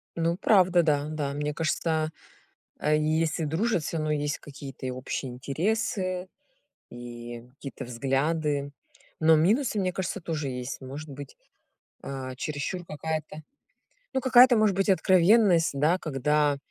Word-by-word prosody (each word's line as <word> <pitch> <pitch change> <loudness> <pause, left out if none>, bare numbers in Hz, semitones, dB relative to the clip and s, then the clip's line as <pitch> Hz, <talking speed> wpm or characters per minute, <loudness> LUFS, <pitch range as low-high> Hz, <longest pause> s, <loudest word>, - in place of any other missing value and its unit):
Ну, 170 +1 0
правда, 185 -4 +4
да, 145 -2 +1
да. 150 -3 -3
Мне 150 +1 -2
кажется, 160 0 -1 0.7
если 155 +2 +1
дружат, 175 +4 0
всё 165 - -3
равно 155 -1 -1
есть 145 -1 -1
какие-то 140 -2 -9
и 130 - -2
общие 130 +1 -4
интересы, 185 - -2 0.6
и 120 -1 -8
какие-то 135 -2 -8
взгляды, 140 +4 -1 0.5
но 160 0 +6
минусы, 215 - +2
мне 185 -2 0
кажется, 190 +2 -3
тоже 155 -4 -3
есть. 125 0 -5
Может 140 +4 -8
быть, 140 0 -9 0.7
а, 130 -1 -5
чересчур 155 +6 -4
какая-то, 155 -1 -5 0.7
ну, 265 - 0
какая-то 255 0 +7
может 215 -3 +3
быть 195 +1 +1
откровенность, 185 -1 +4
да, 150 +6 +2
когда 150 -2 +1
155 Hz, 130 wpm, -27 LUFS, 140-180 Hz, 0.7 s, какая-то